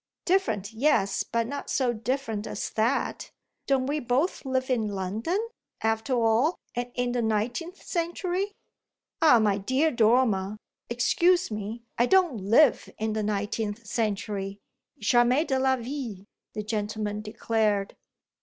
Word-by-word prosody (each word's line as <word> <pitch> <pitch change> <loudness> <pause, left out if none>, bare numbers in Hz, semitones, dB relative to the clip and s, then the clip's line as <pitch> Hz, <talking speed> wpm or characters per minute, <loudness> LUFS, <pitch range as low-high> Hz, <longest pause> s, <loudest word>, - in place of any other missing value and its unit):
"Different, 225 - +1
yes, 220 -5 +2
but 230 0 -1
not 280 +4 -5
so 250 -3 +1
different 230 -2 -3
as - - -4
that. 225 +5 0 0.4
Don't 270 -2 +2
we 290 +3 -1
both 265 +7 0
live 260 0 -1
in 225 -4 +1
London, 205 - -2 0.5
after 225 +3 0
all, 235 +7 +3 0.2
and 245 0 -3
in 245 0 0
the 245 0 0
nineteenth 235 - -2
century?" 360 +3 -2 0.7
"Ah 305 -7 +7
my 205 -3 +2
dear 260 +10 +1
Dormer, 220 -4 +2 0.3
excuse 340 +8 +2
me: 215 +2 -5 0.2
I 240 - +4
don't 360 -8 +4
live 225 +8 +4
in 220 0 -1
the 215 - -1
nineteenth 210 +2 -2
century. 205 -3 -2 0.4
Jamais 240 +7 +3
de 265 -3 0
la 265 0 +3
vie!" 240 -6 -6 0.3
the 210 - -3
gentleman 210 -1 -3
declared. 215 -2 0
230 Hz, 135 wpm, -27 LUFS, 215-265 Hz, 0.7 s, Ah